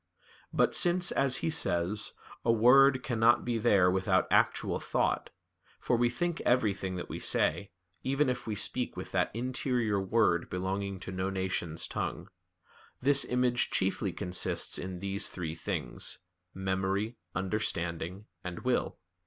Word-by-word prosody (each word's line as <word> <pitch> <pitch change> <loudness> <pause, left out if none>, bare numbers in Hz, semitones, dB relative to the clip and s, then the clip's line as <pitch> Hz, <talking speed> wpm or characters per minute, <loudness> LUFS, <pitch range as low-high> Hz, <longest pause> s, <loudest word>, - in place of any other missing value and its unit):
"But - - +2
since," 175 0 +4
as 135 -1 +3
he 160 - +1
says, 95 - 0 0.3
"a 115 - +3
word 130 +4 +5
cannot 120 -1 +3
be 120 -2 -1
there 100 -5 +4
without 95 0 +2
actual - - +2
thought - - -1 0.5
(for - - 0
we 120 0 +2
think 170 +7 -2
everything 100 -6 0
that 90 - -5
we - - -6
say, 85 +5 +2 0.3
even 135 +2 +1
if 125 -2 -3
we 110 - -2
speak 125 +4 -1
with - - -7
that - - +1
interior 120 -4 0
word 95 -3 +1
belonging 95 +1 -3
to 95 - -6
no 95 +1 -2
nation's 95 -4 -2
tongue), - - -4 0.7
this 140 +1 +4
image 125 -1 +1
chiefly 95 +1 0
consists 90 0 0
in 90 -1 -6
these 100 0 -1
three 85 -4 -5
things, 80 - -3 0.3
memory, 95 +4 -2 0.2
understanding, 95 -1 -2 0.2
and 90 -1 -6
will. 125 -1 -1
105 Hz, 140 wpm, -30 LUFS, 95-125 Hz, 0.7 s, word